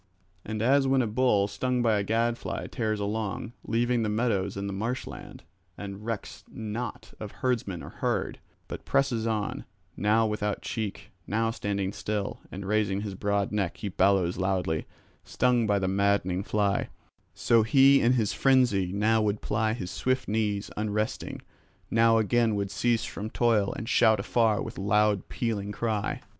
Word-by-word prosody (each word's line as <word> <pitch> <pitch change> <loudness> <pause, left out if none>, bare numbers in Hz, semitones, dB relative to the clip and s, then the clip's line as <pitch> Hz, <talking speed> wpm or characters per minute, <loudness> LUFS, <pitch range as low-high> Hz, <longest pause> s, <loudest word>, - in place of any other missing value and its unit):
And 110 0 -3
as 135 +2 +4
when 135 -1 +3
a - - 0
bull 105 -3 +2
stung 125 +4 -1
by 110 -3 +3
a - - -1
gadfly 115 +3 -1
tears 110 -4 -1
along, 105 +2 -3
leaving 120 +1 +1
the 110 - 0
meadows 105 -3 0
and 100 0 -3
the 100 - -4
marsh 115 +6 -2
land, - - -10 0.3
and 100 0 -7
recks 115 -2 -5
not 110 +1 -6
of 105 -2 -6
herdsmen 115 -8 -2
or - - -8
herd, - - -2 0.3
but - - -7
presses 120 -5 +1
on, 110 -2 -2 0.3
now 110 +2 +2
without 105 -1 -2
cheek, 110 -4 -4 0.2
now 115 +1 0
standing 100 -3 -2
still, 105 -1 -3
and 95 +1 -6
raising 100 -1 +1
his 105 -2 -4
broad 100 +1 -1
neck 100 -5 -1
he 105 - -4
bellows 95 -2 +2
loudly, 90 -4 -1 0.4
stung 125 -3 +1
by 105 -1 +3
the 95 -1 0
maddening 95 -1 +1
fly; 100 -1 0 0.5
so 115 -1 +3
he 135 +5 +5
in 120 +2 +4
his 110 -5 +1
frenzy 125 -9 +3
now 110 +3 +2
would 105 -1 0
ply 110 0 0
his 95 -6 -5
swift 130 0 -1
knees 105 -1 -1
unresting, 105 0 -3 0.5
now 115 0 +5
again 115 0 +2
would 100 -1 -2
cease 120 -2 +1
from 105 +2 -5
toil 110 -4 +2
and 115 - -6
shout 110 -2 +4
afar 115 -3 +1
with - - -7
loud 105 0 +2
pealing 105 -4 -2
cry. 105 -1 -2
105 Hz, 165 wpm, -27 LUFS, 100-115 Hz, 0.5 s, he